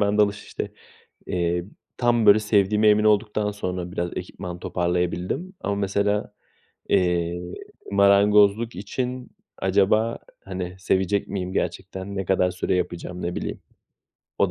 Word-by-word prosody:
ben 105 +1 +2
dalış, 105 0 +2
işte, - - -5 0.6
eee, 85 -1 0 0.3
tam, 120 -2 +2
böyle, 100 +1 +8
sevdiğime 105 0 +3
emin 105 0 +4
olduktan 105 0 +2
sonra 90 -3 -4
biraz 85 -2 -2
ekipman 90 -1 -6
toparlayabildim 90 - -2
ama 100 - -1
mesela, 100 +1 0 0.6
eee, 90 -2 +1 0.5
marangozluk 100 +3 +4
için 125 +6 -4 0.3
acaba, 100 +4 +2 0.3
hani, 90 -1 -5
sevecek 95 +1 0
miyim 95 -2 -3
gerçekten? 95 +1 -3
Ne 95 - -1
kadar 90 0 +2
süre 90 0 -1
yapacağım? 90 0 -3
Ne 85 +1 -2
bileyim. - - -4 0.8
O - - +3
100 Hz, 125 wpm, -24 LUFS, 90-105 Hz, 0.8 s, böyle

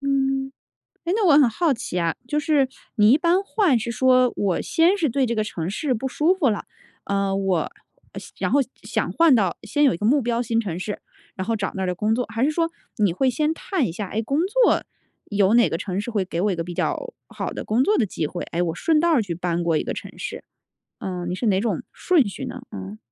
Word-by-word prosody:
嗯。 270 -1 0 0.5
诶 345 - 0
那 435 -3 +2
我 330 - +6
很 275 -5 +6
好 305 +7 +1
奇 235 -7 -4
啊， 165 -1 0
就 300 - 0
是 290 -3 +2 0.3
你 210 0 +6
一 270 - +7
般 350 +4 +2
换 390 - +2
是 230 +1 -4
说， 255 +1 +3
我 195 -4 0
先 345 +4 +3
是 315 - +2
对 270 +2 +1
这 235 - -1
个 215 - +1
城 170 -5 -4
市 260 +6 -1
不 255 +4 -3
舒 310 +8 +2
服 315 -10 +2
了， 210 - -3 0.4
呃， 195 -1 0
我， 195 -2 +1 0.5
呃 - - -7 0.2
然 - - -1
后 285 - +4 0.2
想 - - -2
换 330 -4 +5
到 205 -6 +3
呃 - - -5
先 295 - -1
有 275 - +4
一 - - -3
个 205 - -6
目 280 +5 +4
标 240 -1 0
新 230 0 0
城 180 -6 -4
市， 205 +3 -5 0.4
然 185 - -4
后 225 - +1
找 200 - -3
那 190 - -3
儿 185 - 0
的 180 - -1
工 210 +5 0
作。 250 +1 -1
还 225 +3 -1
是 290 - +3
说 330 +1 0 0.3
你 200 -5 +3
会 260 +6 +2
先 305 +5 0
看 340 - -1
一 - - -3
下， 195 +2 -5
诶， 220 +4 -2
工 275 +6 -1
作 475 +4 +3 0.4
有 205 +1 +2
哪 240 - +5
个 165 - -1
城 190 0 -3
市 225 +4 -5
会 210 -3 0
给 170 - -5
我 210 - +2
一 180 - -3
个 165 - -2
比 175 0 -7
较 - - -2
好 - - -4
的 - - -6
工 225 +4 +2
作 420 +10 +3
的 235 - +3
机 165 -5 -3
会。 175 +4 -5
诶， 170 - -1
我 165 -2 -1
顺 315 - +2
道 340 +1 +2
儿 280 -8 +4
去 185 -5 -4
搬 175 0 -2
过 165 -2 +2
一 - - -1
个 - - -4
城 - - -7
市。 485 - -6 0.6
嗯， 180 -2 -4
你 180 - -2
是 240 - -3
哪 190 -2 +3
种 230 - -1
顺 320 - +2
序 200 - -6
呢？ - - -7
嗯。 95 +2 -7
230 Hz, 275 characters per minute, -23 LUFS, 190-285 Hz, 0.6 s, 一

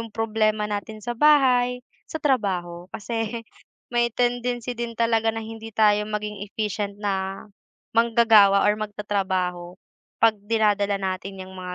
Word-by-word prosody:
yung 230 - -6
problema 215 -1 0
natin 210 +1 -5
sa 240 - -2
bahay, 250 -3 +3 0.2
sa - - -4
trabaho 185 -10 -1
kasi 225 +1 -4 0.5
may 240 0 +2
tendency 245 0 -1
din 235 -1 -4
talaga 225 -1 +1
na 225 - -4
hindi 225 0 -9
tayo 210 -1 +3
maging 210 -1 -4
efficient 210 -1 -3
na 195 -1 -2 0.5
manggagawa 225 -4 +5
or 210 +1 +2
magtatrabaho 190 -4 -2 0.5
'pag 225 -1 +5
dinadala 205 -2 +2
natin 190 0 -4
yang 185 - -11
mga 180 0 -6
215 Hz, 135 wpm, -24 LUFS, 200-230 Hz, 0.5 s, manggagawa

